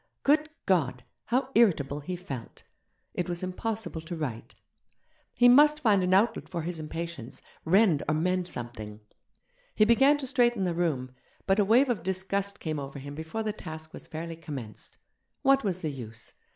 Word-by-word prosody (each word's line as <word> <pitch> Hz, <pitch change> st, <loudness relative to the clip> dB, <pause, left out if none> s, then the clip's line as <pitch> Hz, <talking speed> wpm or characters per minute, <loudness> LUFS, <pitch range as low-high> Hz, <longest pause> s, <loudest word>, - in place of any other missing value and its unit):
Good 305 Hz, +2 st, +3 dB, 0.2 s
God! 135 Hz, -10 st, +1 dB, 0.2 s
how 255 Hz, +2 st, 0 dB
irritable 155 Hz, -, +3 dB
he 180 Hz, +5 st, -5 dB
felt. 140 Hz, -10 st, -8 dB, 0.5 s
It 180 Hz, 0 st, -2 dB
was 175 Hz, +1 st, -3 dB
impossible 200 Hz, -1 st, -3 dB
to 165 Hz, +2 st, -6 dB
write. 130 Hz, -8 st, -5 dB, 0.8 s
He 245 Hz, -, +4 dB
must 295 Hz, +4 st, +7 dB
find 210 Hz, -6 st, +4 dB
an 180 Hz, 0 st, 0 dB
outlet 200 Hz, +5 st, +2 dB
for 170 Hz, -3 st, -3 dB
his 170 Hz, 0 st, -4 dB
impatience, 155 Hz, -5 st, -6 dB, 0.3 s
rend 180 Hz, -3 st, +4 dB
or 155 Hz, -, +2 dB
mend 180 Hz, +3 st, 0 dB
something. 110 Hz, -6 st, -7 dB, 0.7 s
He 215 Hz, -, +5 dB
began 270 Hz, +6 st, +5 dB
to 285 Hz, -, -5 dB
straighten 240 Hz, -5 st, +2 dB
the 180 Hz, -2 st, 0 dB
room, 150 Hz, -7 st, -1 dB, 0.3 s
but 195 Hz, +2 st, +2 dB
a 205 Hz, -, +4 dB
wave 240 Hz, +7 st, +5 dB
of 225 Hz, -8 st, 0 dB
disgust 190 Hz, +2 st, -1 dB
came 155 Hz, -2 st, -3 dB
over 140 Hz, 0 st, -7 dB
him 140 Hz, +1 st, -7 dB
before 160 Hz, +9 st, -4 dB
the 215 Hz, -1 st, -2 dB
task 160 Hz, -5 st, -8 dB
was -, -, -9 dB
fairly 165 Hz, +1 st, -6 dB
commenced. 140 Hz, -9 st, -9 dB, 0.5 s
What 275 Hz, 0 st, +4 dB
was 185 Hz, -3 st, -1 dB
the 155 Hz, -, -1 dB
use? 115 Hz, -4 st, -8 dB
175 Hz, 170 wpm, -28 LUFS, 150-215 Hz, 0.8 s, must